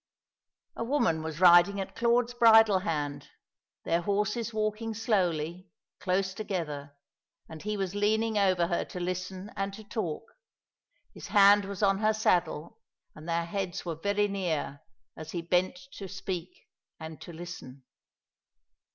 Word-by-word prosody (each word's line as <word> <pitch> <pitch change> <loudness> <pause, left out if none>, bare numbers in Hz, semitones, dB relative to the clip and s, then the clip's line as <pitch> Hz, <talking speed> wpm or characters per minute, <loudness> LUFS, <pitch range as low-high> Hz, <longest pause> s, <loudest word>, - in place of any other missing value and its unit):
A - - -3
woman 230 - +1
was 160 0 -6
riding 180 +2 +6
at 190 - -5
Claude's 240 +1 +2
bridle 225 -4 +6
hand; 145 -5 -3 0.5
their 170 +1 +1
horses 210 +5 -1
walking 215 +1 -2
slowly, 185 -5 -1 0.3
close 190 0 0
together; 155 -9 -5 0.5
and 160 -1 -10
he 210 0 -3
was 190 -2 -2
leaning 215 +2 +1
over 185 -4 +3
her 170 0 -1
to 180 - -8
listen 185 +3 -4
and 195 0 -2
to 220 - -11
talk; 205 -5 -4 0.9
his - - -9
hand 205 0 +6
was 200 +1 -5
on 195 -1 +3
her 215 0 +2
saddle, 175 -7 0 0.3
and 155 +2 -10
their 170 0 0
heads 185 0 -4
were 170 - -2
very 200 +6 0
near, 170 -8 -3 0.3
as 160 0 -9
he 175 - -2
bent 180 +2 +1 0.2
to 195 - -8
speak 185 -1 -6 0.3
and 160 -1 -9
to - - -9
listen. 160 -6 -9
190 Hz, 145 wpm, -29 LUFS, 170-210 Hz, 0.9 s, riding